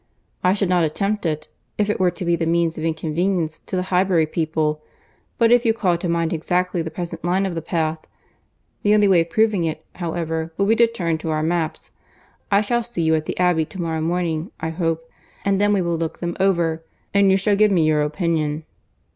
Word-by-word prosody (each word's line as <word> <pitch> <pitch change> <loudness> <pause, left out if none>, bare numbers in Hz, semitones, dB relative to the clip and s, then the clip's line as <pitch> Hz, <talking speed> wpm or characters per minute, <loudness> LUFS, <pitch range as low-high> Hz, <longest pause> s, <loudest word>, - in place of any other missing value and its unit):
I 185 +2 +4
should 200 -2 0
not 180 -1 +3
attempt 200 +5 -1
it, 155 -1 -3 0.3
if 210 - +1
it 210 - -1
were 185 -1 +4
to 175 +1 -6
be 170 0 +3
the 165 -1 -2
means 170 -1 +1
of 155 - -5
inconvenience 165 +1 -1
to - - -6
the 180 - 0
Highbury 180 -3 +3
people, 155 -1 -1 0.6
but 230 -2 +4
if 240 0 +5
you 225 -2 +2
call 185 -6 +1
to 175 - -3
mind 170 -1 0
exactly 180 +2 0
the 160 - -4
present 165 0 -6
line 185 +3 +1
of 190 - -2
the 165 - -3
path.... 160 -1 -1 0.8
The 210 0 +4
only 210 -1 +4
way 185 -3 +5
of 165 - -3
proving 215 -1 +2
it, 155 -1 -3
however, 165 -2 -3
will 200 - +2
be 220 +3 +4
to 235 - +6
turn 170 -8 -2
to 160 - -4
our 155 0 0
maps. 165 -1 -2 0.6
I 200 -1 +4
shall 240 +3 0
see 230 -7 -4
you 160 0 +3
at 155 -1 0
the - - -4
Abbey 180 -3 +2
to 190 - -11
morrow 165 -2 -2
morning 170 +1 -1
I 160 - -2
hope, 165 -1 -2 0.4
and 200 0 +2
then 205 0 +3
we 200 -3 +2
will 170 -1 -1
look 165 -1 -3
them 175 -1 -3
over, 170 -4 +1 0.3
and 200 -1 +5
you 190 - +5
shall 200 +1 +2
give 210 +1 +4
me 175 -5 +3
your 155 -1 +3
opinion." 155 -1 -1
170 Hz, 220 wpm, -21 LUFS, 160-195 Hz, 0.8 s, to